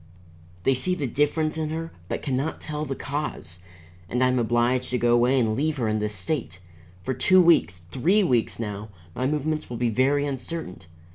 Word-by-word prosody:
They 135 - +4
see 180 +9 0
the 150 - -2
difference 155 +4 0
in 155 -1 -1
her, 165 +1 -4 0.2
but - - -3
can 135 - -1
not 140 +5 -2
tell 150 0 -4
the 135 -2 -3
cause. 140 - -5 0.5
And 125 +4 +1
I 130 - +4
am 125 0 +1
obliged 120 +2 +1
to 125 - 0
go 120 0 +3
away 125 +3 +4
and 110 -3 +1
leave 150 +4 0
her 120 -4 0
in 110 0 0
this 105 0 -2
state. 115 +4 -3 0.5
For 130 - -1
two 185 +9 +4
weeks, 90 - +4
three 185 +11 +3
weeks 125 -9 +1
now, 105 -1 -5 0.2
my 130 +6 -1
movements 150 +1 -2
will 120 - -5
be 120 -1 +1
very 140 +5 +2
uncertain. 140 - -4
130 Hz, 200 wpm, -25 LUFS, 120-155 Hz, 0.5 s, They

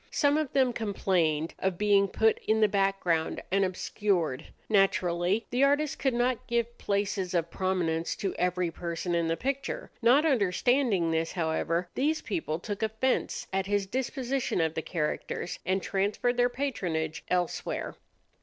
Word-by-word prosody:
Some 285 -1 +2
of 305 -3 0
them 260 -3 +3
complained 175 -8 0
of 190 -2 -1
being 200 -1 +4
put 220 +3 +2
in 220 0 +3
the 215 - +5
background 195 -5 0
and 195 +1 +3
obscured. 185 -5 -1 0.2
Naturally, 190 -1 +2
the 250 +3 +2
artist 285 +1 +2
could 265 -3 +1
not 245 0 0
give 235 0 -1
places 200 -2 -1
of 170 -1 0
prominence 175 -4 -1
to 195 - -2
every 180 -1 0
person 170 +1 -3
in 170 -1 +1
the 165 0 0
picture. 275 +1 -3
Not 255 +7 +5
understanding 230 - +2
this, 165 0 -1
however, 165 +1 -1
these 310 +4 +1
people 165 -9 -2
took 205 +4 -5
offence 220 +4 0
at 190 0 0
his 205 -1 +1
disposition 260 +2 -2
of 160 -1 +1
the 160 - -2
characters, 160 +1 -3
and 190 +1 +1
transferred 205 +5 0
their 245 0 +3
patronage 175 - -2
elsewhere. 180 -1 -2
195 Hz, 150 wpm, -29 LUFS, 175-240 Hz, 0.2 s, the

